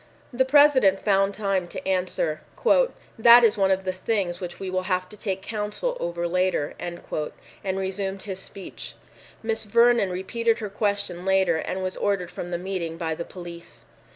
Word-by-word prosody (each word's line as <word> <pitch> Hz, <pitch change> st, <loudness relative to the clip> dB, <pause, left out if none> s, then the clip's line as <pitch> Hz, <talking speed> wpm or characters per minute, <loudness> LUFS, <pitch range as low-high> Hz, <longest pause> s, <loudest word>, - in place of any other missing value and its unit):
The 260 Hz, +2 st, +2 dB
President 265 Hz, -8 st, +6 dB
found 195 Hz, -1 st, +2 dB
time 195 Hz, -4 st, 0 dB
to 175 Hz, -, -7 dB
answer, 180 Hz, -4 st, 0 dB, 0.8 s
"That 235 Hz, +1 st, +9 dB
is 225 Hz, -, +5 dB
one 195 Hz, -2 st, +2 dB
of 190 Hz, 0 st, +1 dB
the 185 Hz, -1 st, -2 dB
things 185 Hz, -2 st, -2 dB
which 175 Hz, -1 st, -6 dB
we 195 Hz, -, -5 dB
will 185 Hz, 0 st, 0 dB
have 185 Hz, 0 st, 0 dB
to 210 Hz, -, -11 dB
take 195 Hz, -2 st, -4 dB
counsel 215 Hz, -, -2 dB
over 170 Hz, 0 st, -2 dB
later," 180 Hz, -4 st, 0 dB
and 175 Hz, 0 st, -6 dB, 0.6 s
resumed 190 Hz, 0 st, -2 dB
his 190 Hz, -3 st, -5 dB
speech. 195 Hz, 0 st, -8 dB, 0.5 s
Miss 225 Hz, 0 st, -1 dB
Vernon 235 Hz, -1 st, +4 dB
repeated 225 Hz, +5 st, 0 dB
her 210 Hz, -3 st, -5 dB
question 200 Hz, -4 st, -1 dB
later 190 Hz, -3 st, +3 dB
and 185 Hz, +4 st, -3 dB
was 185 Hz, 0 st, -3 dB
ordered 190 Hz, -4 st, -1 dB
from 175 Hz, -, -6 dB
the 175 Hz, -, -2 dB
meeting 175 Hz, -3 st, -4 dB
by 165 Hz, -2 st, -2 dB
the 170 Hz, +2 st, -5 dB
police. 175 Hz, -2 st, -10 dB
190 Hz, 170 wpm, -25 LUFS, 180-210 Hz, 0.8 s, That